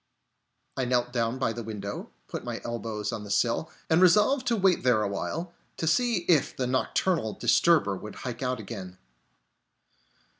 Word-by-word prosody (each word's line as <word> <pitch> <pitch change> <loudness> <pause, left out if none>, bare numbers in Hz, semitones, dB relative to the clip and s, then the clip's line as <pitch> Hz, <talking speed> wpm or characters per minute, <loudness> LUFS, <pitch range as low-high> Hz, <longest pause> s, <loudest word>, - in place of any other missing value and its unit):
I 130 - -1
knelt 125 0 0
down 115 0 0
by 130 -3 0
the 120 - -5
window, 105 -2 -6 0.2
put - - -5
my - - -4
elbows 110 -2 -3
on 110 -2 -4
the 105 - -9
sill, 115 +8 +1 0.2
and 160 +2 +3
resolved 210 +9 +4
to 235 - +3
wait 190 -4 +3
there 120 -4 +3
awhile, 160 - -3 0.2
to - - -2
see 230 +5 +2
if 160 -6 +2
the 130 - 0
nocturnal 130 - 0
disturber 120 - +3
would 105 +3 -8
hike 125 -1 -6
out 125 -2 -1
again. 95 -4 -8
125 Hz, 160 wpm, -27 LUFS, 110-165 Hz, 0.2 s, resolved